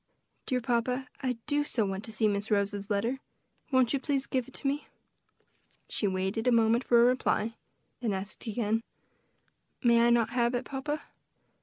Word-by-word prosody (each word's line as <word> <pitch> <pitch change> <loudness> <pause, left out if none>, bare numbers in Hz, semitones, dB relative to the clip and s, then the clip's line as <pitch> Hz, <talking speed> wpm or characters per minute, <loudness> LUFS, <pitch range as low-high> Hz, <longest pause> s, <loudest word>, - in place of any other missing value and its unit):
"Dear 255 -1 +1
papa, 250 +2 0
I 255 -1 0
do 290 0 +1
so 235 -7 0
want 195 +1 -3
to 225 - -8
see 215 0 +2
Miss 205 +1 -1
Rose's 205 0 0
letter; 225 +6 0 0.5
won't 260 -2 +4
you 275 - +1
please 275 -1 0
give 255 -2 -1
it 265 - -14
to - - -3
me?" 285 +2 -1 1.0
She 210 - 0
waited 190 +4 -1
a - - +5
moment 230 +1 +4
for 240 -2 +4
a 235 - +7
reply; 245 -3 +1 0.5
then 235 -3 -1
asked 195 +4 -5
again, 220 0 0 1.0
"May 235 -1 +5
I 235 - +5
not 235 -1 +3
have 240 0 +1
it, 245 +1 -2
papa?" 290 +2 -3
235 Hz, 175 wpm, -30 LUFS, 215-255 Hz, 1.0 s, a